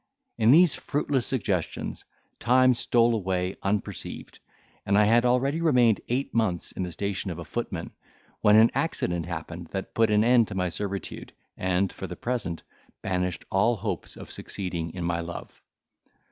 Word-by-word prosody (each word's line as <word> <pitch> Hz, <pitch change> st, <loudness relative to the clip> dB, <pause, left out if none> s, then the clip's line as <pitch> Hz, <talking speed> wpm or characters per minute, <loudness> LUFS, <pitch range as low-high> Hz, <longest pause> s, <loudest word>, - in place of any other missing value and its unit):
In 110 Hz, 0 st, +4 dB
these 160 Hz, +2 st, +7 dB
fruitless 140 Hz, -3 st, -1 dB
suggestions 100 Hz, -, -2 dB, 0.3 s
time 130 Hz, +1 st, +5 dB
stole 120 Hz, 0 st, +3 dB
away 95 Hz, -3 st, -1 dB
unperceived, 100 Hz, +1 st, -4 dB, 0.4 s
and 100 Hz, +1 st, +2 dB
I 105 Hz, -, +6 dB
had 120 Hz, +3 st, +4 dB
already 135 Hz, +6 st, +2 dB
remained 125 Hz, -9 st, +4 dB
eight 130 Hz, +3 st, -1 dB
months 105 Hz, -7 st, 0 dB
in -, -, -6 dB
the 90 Hz, -1 st, -3 dB
station 100 Hz, +2 st, -3 dB
of 85 Hz, -, -5 dB
a 85 Hz, -, -7 dB
footman, 90 Hz, -5 st, -4 dB, 0.5 s
when 105 Hz, 0 st, +5 dB
an 110 Hz, +2 st, +7 dB
accident 85 Hz, -, -1 dB
happened 85 Hz, 0 st, -6 dB
that 95 Hz, -1 st, -4 dB
put 115 Hz, -1 st, +3 dB
an 105 Hz, 0 st, +4 dB
end 120 Hz, -1 st, +5 dB
to -, -, -7 dB
my 90 Hz, -1 st, 0 dB
servitude, 100 Hz, +1 st, -5 dB, 0.2 s
and, 95 Hz, +1 st, 0 dB
for -, -, -6 dB
the -, -, -7 dB
present, 115 Hz, -9 st, -3 dB, 0.4 s
banished 90 Hz, -2 st, -2 dB
all 115 Hz, +5 st, +3 dB
hopes 100 Hz, -, -5 dB
of -, -, -10 dB
succeeding 85 Hz, -4 st, -4 dB
in 90 Hz, -, -4 dB
my 85 Hz, 0 st, 0 dB
love. 85 Hz, 0 st, -8 dB
100 Hz, 160 wpm, -26 LUFS, 90-120 Hz, 0.5 s, these